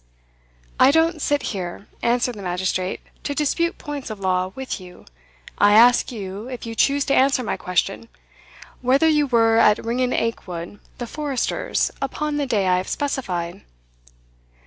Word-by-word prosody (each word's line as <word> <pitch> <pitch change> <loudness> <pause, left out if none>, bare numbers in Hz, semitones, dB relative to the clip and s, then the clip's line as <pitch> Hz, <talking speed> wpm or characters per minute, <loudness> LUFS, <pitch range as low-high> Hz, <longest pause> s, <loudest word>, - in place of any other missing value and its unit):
"I 260 - +7
don't 320 +2 +2
sit 290 0 +1
here," 185 0 -5 0.2
answered 245 +1 +1
the 210 - -9
magistrate, 185 0 -2 0.2
"to 285 - -3
dispute 335 +4 0
points 290 -5 -6
of 215 -2 -6
law 185 -1 0
with 265 -6 -5
you. 180 -1 -14 0.5
I 205 0 +6
ask 240 +4 +6
you, 200 -1 -6
if 250 -2 -7
you 230 - -5
choose 280 +4 +2
to 275 - +1
answer 265 -1 +3
my - - -2
question, 195 +5 -2 0.7
whether 265 +5 +3
you 300 -2 +3
were 225 -2 +4
at 210 0 +4
Ringan 250 +2 0
Aikwood, 185 -4 -3 0.2
the 240 - -4
forester's, 285 0 -1
upon 295 +2 -2
the 285 -2 -1
day 210 -6 +1
I 180 0 +3
have 185 - -3
specified?" 185 -12 -3
235 Hz, 155 wpm, -22 LUFS, 195-275 Hz, 0.7 s, I